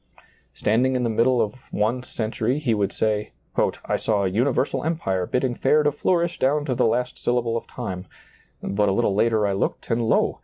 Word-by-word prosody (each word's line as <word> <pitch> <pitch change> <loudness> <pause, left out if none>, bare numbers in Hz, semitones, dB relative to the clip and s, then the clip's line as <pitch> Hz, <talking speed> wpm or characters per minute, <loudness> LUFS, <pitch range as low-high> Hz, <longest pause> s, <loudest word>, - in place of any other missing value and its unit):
Standing 125 +5 +2
in 125 - 0
the 115 - 0
midst 115 +2 +3
of 125 -1 0
one 110 +5 0
cen 110 -3 -4
tury 120 +5 0
he 140 -6 0
would 100 -2 0
say, 105 -1 -1 0.3
" - - -1
I - - +1
saw 105 -3 0
a - - +2
universal 125 +5 0
empire 95 - -1
bid 125 - 0
ding 130 -2 0
fair 150 +5 +3
to 145 - +3
flourish 170 +3 0
down 145 +3 +2
to 130 - 0
the 120 - +2
last 125 +2 -1
syllable 120 -1 0
of 115 - -4
time; 90 0 -6 0.6
but 105 +1 +1
a - - +2
little 100 - +1
later 110 +1 +2
I 100 - +1
looked, 95 - -2
and 115 +1 +2
lo - - +2
115 Hz, 215 wpm, -23 LUFS, 105-130 Hz, 0.6 s, midst